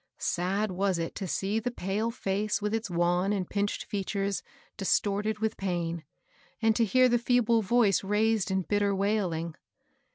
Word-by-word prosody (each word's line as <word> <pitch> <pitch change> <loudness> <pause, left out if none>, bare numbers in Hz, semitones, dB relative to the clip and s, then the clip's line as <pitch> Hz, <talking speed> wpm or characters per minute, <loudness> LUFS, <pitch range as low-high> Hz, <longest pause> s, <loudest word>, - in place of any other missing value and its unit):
Sad 190 +4 -1
was 190 0 0
it 165 -1 -3
to 195 - -4
see 195 +5 -1
the 235 +2 -2
pale 215 0 -2
face 210 -3 -1
with 210 0 -2
its 225 -1 -2
wan 175 +2 +1
and 190 -3 -1
pinched 205 0 -2
features 200 0 -2 0.3
distorted 205 +1 0
with 220 +1 -2
pain, 170 -3 -2 0.6
and 225 -1 +3
to 230 - +3
hear 255 +5 +4
the 240 -1 +2
feeble 235 -1 +3
voice 210 -2 +3
raised 210 0 +1
in 190 0 0
bitter 205 +1 +1
wailing. 190 -5 0
200 Hz, 160 wpm, -29 LUFS, 190-220 Hz, 0.6 s, hear